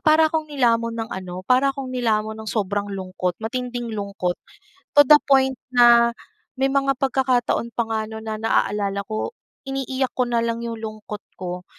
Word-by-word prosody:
para 315 0 +4
akong 315 -1 -1
nilamon 230 -4 +1
ng 225 -1 -4
ano 185 0 -6
para 255 +5 +4
akong 270 -2 -4
nilamon 220 -3 0
nung 220 - -6
sobrang 205 -1 -1
lungkot, 185 -2 -3
matinding 240 0 -4
lungkot 200 -3 -2 0.6
to 290 - +9
the 295 +1 +8
point 265 -2 +3 0.2
na 235 -1 +6 0.4
may 270 +1 +1
mga 275 0 +2
pagkakataon 255 -3 +1
pa 235 - 0
nga 220 -1 0
no'n 220 0 -8
na 220 -1 -4
naalala 205 -2 0
ko, 215 - -3 0.3
iniiyak 270 -1 -2
ko 250 -1 0
na 235 - +1
lang 230 0 -2
yung 230 -1 -4
lungkot 215 -1 -7
ko. 180 -1 -6
235 Hz, 170 wpm, -22 LUFS, 215-265 Hz, 0.6 s, to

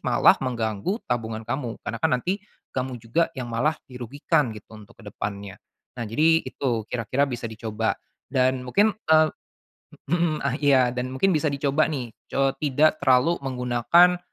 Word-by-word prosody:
malah - - +5
mengganggu 115 - -2
tabungan 115 -2 -3
kamu. 120 -1 -3
Karena 115 -1 -4
kan - - +3
nanti 185 +10 -2 0.3
kamu 130 -1 -2
juga 120 +9 0
yang 125 - -4
malah 150 +7 +1
dirugikan 130 +3 -1
gitu, 105 - -14
untuk 100 - -17
ke - - -15
depannya. 100 -1 -6 0.4
Nah, 120 - -4
jadi 160 +7 +4
itu 125 -4 -2
kira-kira 125 +3 -1
bisa 120 -2 -5
dicoba 110 0 -2 0.4
dan 130 0 +2
mungkin, 205 - +3 0.2
eee 155 0 +5 0.8
mhm, 170 -3 +1
ah 140 -2 0
iya, 130 -4 +4
dan 125 +1 -4
mungkin 190 +9 +2
bisa 155 -2 +1
dicoba 140 +1 +1
nih, 130 -7 -4 0.2
co 135 0 +1
tidak 150 +2 +2
terlalu 140 +5 +3
menggunakan, 130 +7 +3
130 Hz, 155 wpm, -24 LUFS, 115-150 Hz, 0.8 s, malah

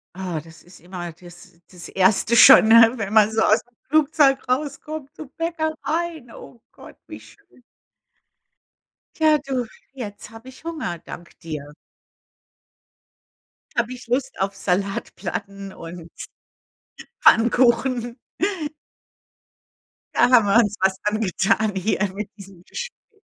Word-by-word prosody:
Ah, 180 -4 -4
das 160 +2 -16
ist 175 - -17
immer 175 0 -7
das 175 +1 -16
das 180 -2 -10
Erste 195 +4 +2
schon, 230 - +9
ne? 230 +1 +7
Wenn 200 -3 -4
man 215 -1 +5
so 220 0 +1
ausm 220 +3 +2 0.2
Flugzeug 295 -2 +3
rauskommt, 280 +2 -3
zum 300 -4 -10
Bäcker 325 -1 -2
rein. 320 -5 -3
Oh 235 - -13
Gott, - - -15
wie - - -10
schön. 390 -10 -21 1.6
Tja, 310 -1 +4
du, 255 -3 -2 0.3
jetzt 215 -6 -8
habe 225 +2 -13
ich 260 - -14
Hunger, 310 - -4
dank 170 0 -11
dir. 150 -4 -7 2.0
Da 235 - +3
habe 240 +2 -10
ich 245 -1 -11
Lust 255 +2 -2
auf 195 +1 -1
Salatplatten 195 +1 -4
und 170 -1 -10 1.1
Pfannkuchen. 240 +1 +3 2.0
Da - - +4
haben 240 -5 +6
wir 200 - +2
uns 215 -3 +3
was 190 0 +2
angetan 210 0 0
hier 200 +1 0
mit 210 0 -5
diesem 195 -3 -14
Gesprä 480 - -9
220 Hz, 125 wpm, -22 LUFS, 190-265 Hz, 2.0 s, schon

